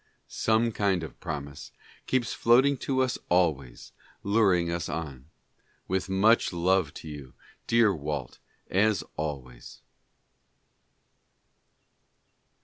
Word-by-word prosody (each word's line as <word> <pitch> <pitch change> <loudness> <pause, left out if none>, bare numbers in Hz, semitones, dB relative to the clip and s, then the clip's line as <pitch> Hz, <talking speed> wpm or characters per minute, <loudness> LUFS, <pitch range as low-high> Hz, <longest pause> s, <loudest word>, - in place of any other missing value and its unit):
Some 110 +1 +1
kind 100 -5 0
of 80 - -9
promise 75 -3 -6 0.4
keeps 130 -2 0
floating 130 +4 +4
to 130 0 0
us 130 - -2
always, 75 -9 0 0.3
luring 95 -5 +2
us 85 -1 -3
on. 70 -4 -6 0.6
With 95 0 -2
much 105 +5 +3
love 90 -2 +1
to - - -9
you, 70 -4 -9 0.3
dear 115 -3 +4
Walt, 75 -4 -5 0.3
as 100 -2 +2
always. 70 -6 -6
90 Hz, 100 wpm, -27 LUFS, 75-110 Hz, 0.6 s, floating